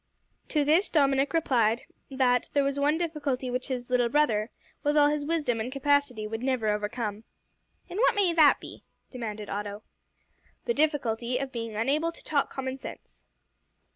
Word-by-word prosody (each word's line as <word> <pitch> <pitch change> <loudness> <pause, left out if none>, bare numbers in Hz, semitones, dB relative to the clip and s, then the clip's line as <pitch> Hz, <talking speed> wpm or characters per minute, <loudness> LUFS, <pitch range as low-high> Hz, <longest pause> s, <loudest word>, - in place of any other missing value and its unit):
To 300 -2 +1
this 325 +7 +3
Dominick 275 -2 +2
replied 240 -8 +2 0.3
that 255 -2 +1
there 285 - +3
was 275 0 -1
one 295 +2 +2
difficulty 290 -7 -2
which 250 +1 -2
his 250 -2 -4
little 245 -1 +3
brother, 235 -6 +2 0.3
with 295 0 +1
all 290 0 +6
his 295 0 -1
wisdom 290 -7 0
and 230 +3 -3
capacity, 275 -5 +1
would 225 +1 -4
never 255 -4 0
overcome. 210 0 -2 0.6
"And 370 - -5
what - - +4
may 385 -4 +2
that 310 -3 +6
be?" - - -11 0.3
demanded 215 -4 -5
Otto. 205 +1 -5 0.8
"The 470 - +1
difficulty 250 - 0
of 270 0 -4
being 230 -3 -5
unable 285 +9 +1
to - - -15
talk 285 -2 0
common 265 0 -5
sense." - - -11
265 Hz, 165 wpm, -28 LUFS, 230-295 Hz, 0.8 s, all